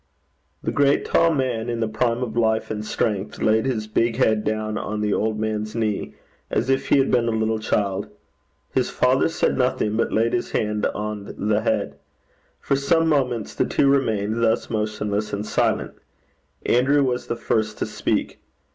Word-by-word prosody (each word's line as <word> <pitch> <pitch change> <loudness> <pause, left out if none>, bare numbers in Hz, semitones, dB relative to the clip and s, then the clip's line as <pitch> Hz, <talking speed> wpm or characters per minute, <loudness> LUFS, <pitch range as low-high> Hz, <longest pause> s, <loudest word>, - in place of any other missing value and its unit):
The - - -1
great 140 0 +2
tall 165 - +3
man, 125 -6 -1
in 120 -1 -2
the 115 - 0
prime 115 +2 0
of 115 -3 -5
life 110 -2 +1
and 105 -1 -3
strength, 105 -1 -2
laid 110 +3 +2
his 110 -5 -1
big 115 +1 0
head 110 -4 +2
down 110 0 -2
on 110 -1 -3
the 105 -1 +1
old 110 0 0
man's 110 0 -2
knee, 110 -3 -2 0.3
as 125 +3 0
if 135 +1 0
he - - +4
had 135 - +2
been 120 -2 +2
a - - +1
little 110 0 0
child. 100 -1 -1 0.6
His - - +1
father - - +2
said - - 0
nothing, 105 0 +1
but 115 - 0
laid 115 +1 +1
his 120 - -1
hand 105 -1 0
on 105 -1 -5
the 105 0 +2
head. 105 -2 -1 0.6
For 140 - 0
some 165 +4 +2
moments 125 -7 0
the - - +1
two 140 - +2
remained 110 -5 +1
thus, 115 0 +1
motionless 105 -1 -2
and 100 +1 -2
silent. - - 0 0.7
Andrew 140 +4 +3
was 125 -2 -1
the 120 - -2
first 110 -1 -1
to - - -1
speak. - - -2
110 Hz, 180 wpm, -23 LUFS, 105-125 Hz, 0.7 s, he